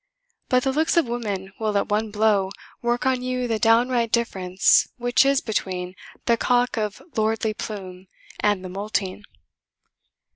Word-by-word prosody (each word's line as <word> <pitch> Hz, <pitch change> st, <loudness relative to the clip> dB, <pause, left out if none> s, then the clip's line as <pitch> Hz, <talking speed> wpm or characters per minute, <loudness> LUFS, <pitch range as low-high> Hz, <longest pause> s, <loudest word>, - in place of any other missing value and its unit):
But 255 Hz, -1 st, +3 dB
the 270 Hz, -, +1 dB
looks 315 Hz, +4 st, +1 dB
of 335 Hz, -, +5 dB
women 205 Hz, -5 st, -4 dB
will 215 Hz, -2 st, 0 dB
at -, -, -1 dB
one 215 Hz, +1 st, 0 dB
blow 205 Hz, -2 st, +2 dB, 0.3 s
work 240 Hz, 0 st, 0 dB
on 260 Hz, -1 st, +2 dB
you 250 Hz, 0 st, -2 dB
the 225 Hz, -2 st, -1 dB
downright 235 Hz, +1 st, +3 dB
difference 190 Hz, -5 st, +3 dB
which 245 Hz, +1 st, +3 dB
is 275 Hz, -1 st, +3 dB
between 185 Hz, -4 st, -3 dB, 0.3 s
the 235 Hz, -1 st, +3 dB
cock 245 Hz, +1 st, +2 dB
of 210 Hz, -3 st, -3 dB
lordly 220 Hz, 0 st, 0 dB
plume 190 Hz, -4 st, -7 dB, 0.3 s
and 205 Hz, -3 st, +1 dB
the -, -, -6 dB
moulting. 200 Hz, 0 st, -3 dB
220 Hz, 150 wpm, -23 LUFS, 200-245 Hz, 0.3 s, of